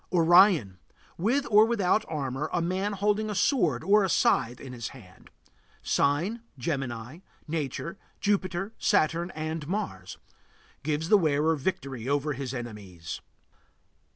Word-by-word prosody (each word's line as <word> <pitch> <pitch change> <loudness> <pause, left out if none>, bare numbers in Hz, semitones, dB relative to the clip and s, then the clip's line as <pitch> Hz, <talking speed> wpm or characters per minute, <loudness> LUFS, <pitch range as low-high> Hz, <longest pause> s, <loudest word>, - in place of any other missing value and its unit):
ORION. 170 - +5 0.4
With 245 +11 +1
or 210 +1 +8
without 215 -2 +2
armor, 135 -2 -3
man 185 +4 -1
holding 210 +2 0
a 210 - -3
sword 175 - +2
or 205 +1 +4
a 190 - 0
scythe 120 -6 +2
in 130 -2 -9
his 120 -2 -5
hand. 95 -9 -14 0.5
Sign: 175 +12 +1 0.2
Gemini. 130 0 -4 0.3
Nature: 160 +3 -4 0.2
Jupiter, 195 0 -1
Saturn, 170 -2 +2
and 155 -1 -4
Mars. 95 - -4 0.6
Gives 155 +3 -2
the 210 - +6
wearer 155 -1 +2
victory 135 -5 -3
over 145 +1 0
his 135 -1 -5
enemies. 105 - -7
155 Hz, 125 wpm, -27 LUFS, 130-195 Hz, 0.6 s, or